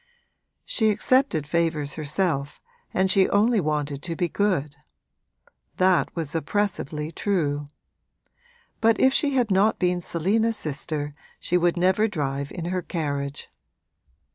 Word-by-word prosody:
She 220 -2 +2
accepted 235 - +2
favours 155 -2 0
herself 150 -2 -2 0.3
and 190 +1 +2
she 190 -1 +4
only 220 +3 +3
wanted 150 -2 -2
to 165 +1 -4
be 175 - 0
good: 170 -7 0 1.0
that 185 -1 +3
was 160 -4 -3
oppressively 160 -3 -2
true; 150 -6 -1 1.1
but 225 0 +3
if 260 0 +4
she 280 -1 +2
had 240 -5 +1
not 195 +3 +3
been 180 -1 0
Selina's 215 +8 0
sister 145 0 -4 0.3
she 180 - -1
would 175 0 +2
never 190 +5 +3
drive 140 -7 -3
in 170 - -5
her 185 - 0
carriage. 145 -5 -3
170 Hz, 125 wpm, -24 LUFS, 150-200 Hz, 1.1 s, she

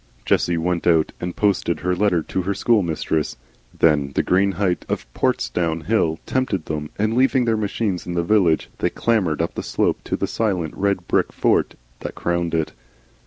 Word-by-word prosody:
Jessie 85 -1 +2
went 85 +1 -1
out 80 -2 +3
and 90 0 -4
posted 100 -4 +1
her 90 0 0
letter 90 -4 +2
to 95 - -2
her 100 +2 -2
school 110 +1 +3
friend. 80 -2 -1 0.4
Then 75 -4 +3
the - - +2
green 95 +2 +2
height 90 -1 0
of - - -2
Portsdown 80 +6 0
Hill 85 -5 +1
tempted 130 -10 -1
them, 75 -1 -4
and 110 +2 +1
leaving 130 0 +3
their 115 -1 +2
machines 105 -3 -2
in 90 - -3
the 85 - +1
village 85 -4 +2
they - - +1
clambered 95 -9 +1
up 85 - -3
the - - -4
slope - - 0
to - - -1
the - - 0
silent 90 -8 -1
red 100 -3 -1
brick - - +1
fort - - +1 0.2
that - - -6
crowned 85 -1 -1
it. 80 -1 -1
90 Hz, 185 wpm, -22 LUFS, 80-100 Hz, 0.4 s, out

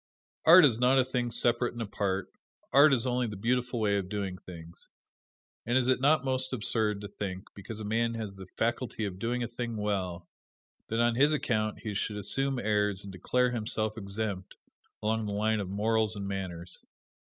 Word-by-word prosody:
Art 170 +1 +9
is 120 -5 +2
not 125 +2 +4
a 130 - +4
thing 125 -2 -1
separate 120 +1 +1
and 120 - -6
apart 100 -2 -2 0.4
art 145 +3 +7
is 130 -3 +3
only 125 -1 0
the 105 - -6
beautiful 120 +3 -1
way 100 -2 +2
of 95 -1 -6
doing 95 -3 -4
things. 85 -1 -12 0.7
And 120 +2 +1
is 130 -1 +2
it 130 0 +2
not 145 0 +3
most 130 0 +1
absurd 110 -3 +2
to 100 - -6
think, 95 -2 -5
because 100 +2 -8
a - - -5
man 115 +2 0
has 110 -4 -5
the 95 -1 -10
faculty 115 -1 -1
of 95 -2 -6
doing 120 +3 -1
a - - -2
thing 120 -1 -5
well, 95 -4 -2 0.6
that 115 - -2
on 120 0 +3
this 145 +6 +4
account 110 -7 -1
he 105 - -4
should 105 +1 -2
assume 135 +6 0
airs 105 -3 0
and 100 -1 -8
declare 125 +7 +1
himself 110 -2 -1
exempt 100 -2 -4 0.5
along 110 0 0
the 100 - -3
line 110 +1 +1
of 100 -3 -4
morals 110 0 +1
and 100 -1 -5
manners? 90 -3 -6
110 Hz, 190 wpm, -29 LUFS, 100-120 Hz, 0.7 s, Art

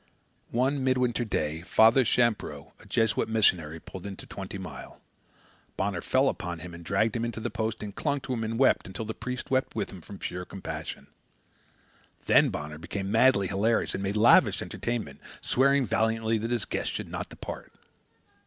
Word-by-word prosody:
One 130 +3 +1
midwinter 125 -2 +2
day, 80 -7 -2
Father 110 +7 +5
Champreau, 105 - 0
a - - -16
Jesuit 110 +1 +1
missionary, 85 -8 +2
pulled 95 +4 -9
into 95 - -8
Twenty 100 0 -7
Mile. 90 -6 -9 0.8
Bonner 95 -2 -1
fell 130 +8 +2
upon 85 -8 -2
him 85 +2 -9
and 85 0 -9
dragged 100 +7 +1
him 115 - -1
into 115 -1 -3
the 115 +2 -3
post, 110 -1 -2
and 105 -1 -6
clung 145 +4 -1
to 130 - -3
him 115 -2 -2
and 110 +1 -2
wept, 135 +1 +3
until 100 +4 -5
the 110 - -4
priest 125 +3 -6
wept 130 0 +1
with 105 -3 -2
him 95 - -10
from 100 +5 -10
sheer 90 0 -4
compassion. 95 +1 -6 1.2
Then - - +5
Bonner 75 +1 -5
became 95 +4 -4
madly 115 -2 +5
hilarious 100 +5 +1
and - - -3
made 100 +2 -1
lavish 115 +3 +5
entertainment, 115 -13 -4 0.2
swearing 140 +1 +3
valiantly 110 +1 +1
that 115 +2 -3
his 120 -3 0
guest - - -2
should - - -4
not - - -4
depart. - - -8
110 Hz, 175 wpm, -28 LUFS, 95-120 Hz, 1.2 s, Father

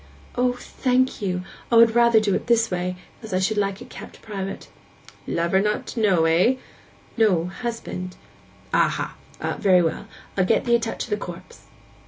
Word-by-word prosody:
'O, 245 0 +1
thank 255 0 0
you! 180 -2 -1 0.3
I - - +4
would 230 -1 +7
rather 235 -1 +5
do 210 -2 +1
it - - -2
this 230 -2 +3
way, 180 0 -2 0.3
as 220 -5 -4
I - - +2
should 210 +3 0
like 200 -1 -1
it - - -16
kept - - -11
private.' 195 -3 -5 0.6
'Lover 170 +3 +1
not 210 +1 -1
to - - -4
know, 190 -7 +3
eh?' 175 +10 +4 0.6
'No—husband.' 185 -1 -1 0.6
'Aha! - - +1 0.4
Very 185 -4 +5
well. 165 - -2 0.3
I'll 185 - +2
get 190 - +1
ee' 235 - +3
a 235 - +5
touch 230 0 -3
of 235 - -10
the 210 - +1
corpse. 175 -4 -10
205 Hz, 170 wpm, -23 LUFS, 180-230 Hz, 0.6 s, would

